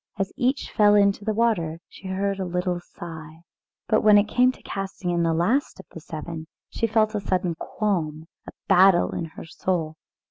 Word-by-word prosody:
As 195 -1 -2
each 260 +3 -1
fell 210 -1 +5
into 200 0 +3
the 215 - 0
water 180 -9 +1
she 195 - -12
heard 195 +1 -1
a - - -1
little 180 0 -2
sigh. 160 -2 -10 0.5
But 215 - +3
when 210 -1 +7
it 205 - +5
came 250 +4 +3
to - - -18
casting 195 -2 -4
in 170 0 +1
the 165 -1 +2
last 205 - 0
of 190 - -11
the - - -9
seven 160 +1 -7 0.2
she 230 - 0
felt 215 0 +2
a 210 - -1
sudden 180 -2 0
qualm, 165 -4 -2
and - - -36 0.2
a - - -7 0.2
battle 190 -2 +5
in 170 - -3
her 160 - -10
soul. 160 -2 -2
190 Hz, 200 wpm, -24 LUFS, 165-210 Hz, 0.5 s, when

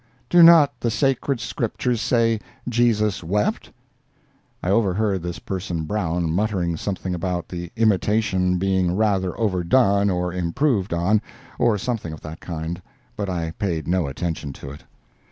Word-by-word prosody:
Do 175 - +7
not 165 -4 +7
the 120 - 0
sacred 135 +1 0
scriptures 115 +1 -2
say 115 -2 +2 0.3
'Jesus 110 -5 +1
wept'?" 105 +5 -1 0.9
I 90 - 0
overheard 100 -2 +1
this 85 0 -5
person 90 -4 -4
Brown 85 -3 -1
muttering 90 -2 0
something 95 +1 -3
about 90 0 -3
the 85 -1 -6
imitation 105 -4 +2
being 95 -1 +1
rather 95 -3 0
overdone 100 +1 +2
or 90 -1 -1
improved 95 - 0
on, 90 +5 +2 0.4
or 115 -3 +3
something 105 -6 -3
of 80 - -10
that 80 +1 -8
kind, 85 +1 -5 0.3
but 100 -2 -3
I 85 -3 -2
paid 85 -4 -3
no 90 -3 +1
attention 75 0 -4
to 70 - -9
it. 75 - -11
95 Hz, 140 wpm, -22 LUFS, 85-110 Hz, 0.9 s, Do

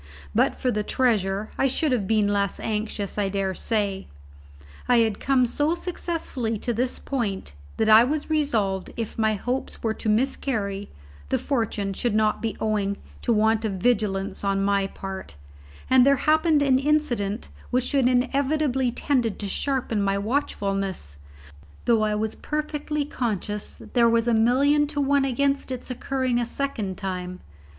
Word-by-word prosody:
But - - +3
for 250 - 0
the 210 - 0
treasure 210 -4 0
I 270 - +4
should 290 +3 +1
have 220 -7 0
been 215 -1 +3
less 200 -2 0
anxious, 210 -2 -3
I 200 -1 +1
dare 195 -1 -1
say. 200 -1 -1 0.8
I 245 - +6
had 220 -3 +2
come 265 -2 +3
so 290 +7 +1
successfully 330 -10 -3
to 240 +3 -2
this 245 +3 -1
point 210 - -3 0.2
that 220 - +1
I 220 +1 +8
was 295 +4 -1
resolved, 225 - 0
if 230 -1 -4
my 220 -1 +2
hopes 250 +6 -4
were 220 -1 +1
to 220 - -3
miscarry, 210 -4 0 0.4
the - - +2
misfortune 220 -7 -1
should 230 +2 -1
not 215 -1 +2
be 225 -1 -3
owing 205 -2 0 0.2
to 240 - 0
want 220 0 +3
of 215 -3 -1
vigilance 200 -2 0
on 195 0 +1
my 200 -1 +2
part; 190 - -7 0.5
and 255 -1 +6
there 280 +2 +5
happened 310 +1 +3
an 265 -2 +4
incident 265 -8 0 0.2
which 255 +2 0
inevitably 265 +1 +2
tended 240 -3 0
to 205 - -4
sharpen 245 -1 -1
my 195 0 +1
watchfulness, 195 - -2 0.7
though 230 -2 +4
I 215 -1 +1
was 220 +1 -1
perfectly 300 -1 -3
conscious 210 -6 -3
there 235 -2 +5
was 230 0 +2
a 235 - +3
million 275 +6 +3
to 295 0 -3
one 280 0 +3
against 275 +1 0
its 255 0 -5
occurring 255 -1 -1
a 240 - 0
second 225 -9 -3
time. 185 -2 -5
230 Hz, 160 wpm, -25 LUFS, 205-270 Hz, 0.8 s, I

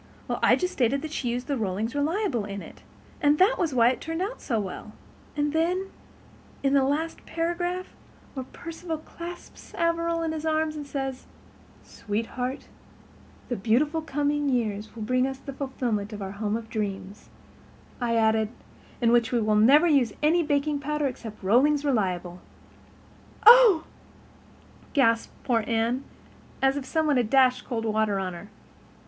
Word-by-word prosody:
Well, - - -2
I - - +5
just 365 0 -2
stated 270 +3 +1
that 315 - -5
she 255 -5 -2
used 245 +1 -2
the 285 -2 -2
Rollings 215 +1 -2
Reliable 305 - 0
in 200 -1 -6
it, - - -13 0.4
and 290 0 +4
that 390 +8 +4
was 340 -5 +1
why 240 -2 +5
it 255 - -2
turned 325 +1 -4
out 430 +6 -5
so 230 -5 -1
well; 205 +2 -6 0.4
and 295 0 0
then, 360 +4 0 0.7
in 275 0 +2
the 275 -1 +4
last 305 +5 -1
paragraph, 350 +2 -2 0.4
where 260 -2 -6
Perceval 330 0 -6
clasps 340 +3 -10
Averil 335 0 0
in 325 - -1
his 315 -1 -4
arms 315 -1 0
and 295 -2 -6
says, 270 -2 -4 0.6
'Sweetheart, 235 +5 -4 0.8
the 245 - -2
beautiful 265 - +1
coming 290 -1 0
years 220 -4 -2
will 225 - -5
bring 255 +3 +1
us 265 0 -5
the 275 +1 -8
fulfilment 245 -6 -3
of 210 - -7
our 190 - -5
home 210 +2 -2
of 230 -1 -9
dreams,' 200 -2 -5 0.7
I 235 -1 +1
added, 220 -1 +2 0.5
'in 235 -1 +4
which 235 -1 +3
we 240 - +2
will 215 -1 +1
never 270 +10 +6
use 275 -10 +3
any 330 +3 +4
baking 295 -1 0
powder 300 +1 -2
except 225 -6 -6
Rollings 280 +9 +3
Reliable.'" 180 -8 -1 1.0
"Oh," 455 -8 +8 1.1
gasped 230 -5 +2
poor 230 -3 +1
Anne, 235 +3 0 0.6
as 270 0 +3
if 285 -2 -4
some 320 +2 0
one 295 -3 +3
had 240 -3 +1
dashed 255 -1 +4
cold 230 -3 -3
water 215 -2 +1
on 185 -2 -3
her. 190 +4 -10
265 Hz, 165 wpm, -26 LUFS, 225-310 Hz, 1.1 s, Oh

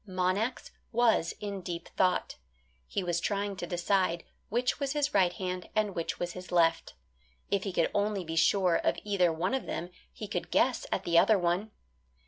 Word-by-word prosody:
Monax 185 +6 -1 0.2
was 230 -7 +2
in 200 -2 -4
deep 170 -1 -5
thought. 185 -1 0 0.5
He 195 - -2
was 175 -1 0
trying 200 +1 -1
to 175 - -4
decide 175 -1 +1 0.3
which 245 +3 0
was 280 -1 -1
his 295 -1 0
right 185 -3 +4
hand 185 -1 -4
and 215 -2 +1
which 170 -2 -3
was 175 0 -2
his 180 0 -9
left. 165 -2 +2 0.6
If 200 0 +1
he 195 - -2
could 170 -2 +1
only 205 -2 0
be 165 0 -4
sure 180 +1 +4
of - - 0
either 195 -4 +2
one 170 +8 -1
of 265 - -2
them 175 +2 -4 0.2
he 60 - -7
could - - -3
guess - - +2
at - - 0
the 170 -1 +4
other 220 - +5
one. 180 +4 0
185 Hz, 185 wpm, -30 LUFS, 175-205 Hz, 0.6 s, other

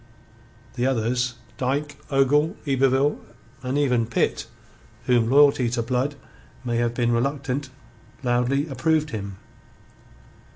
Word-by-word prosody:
The 125 +1 0
others 125 0 0 0.2
Dyke, 140 +3 -1
Ogle, 145 +3 +3
Yberville, 135 +1 +2 0.4
and 130 +2 -2
even 125 -5 +2
Pitt, 115 - 0 0.6
whom 120 -2 +3
loyalty 140 -2 +5
to 120 0 -1
Blood 130 +4 -1 0.5
may 120 -1 0
have 120 0 0
made 120 -1 +2
reluctant 135 +3 -1 0.5
loudly 125 +4 +1
approved 155 +2 0
him. 100 -4 -5
130 Hz, 110 wpm, -24 LUFS, 120-140 Hz, 0.6 s, loyalty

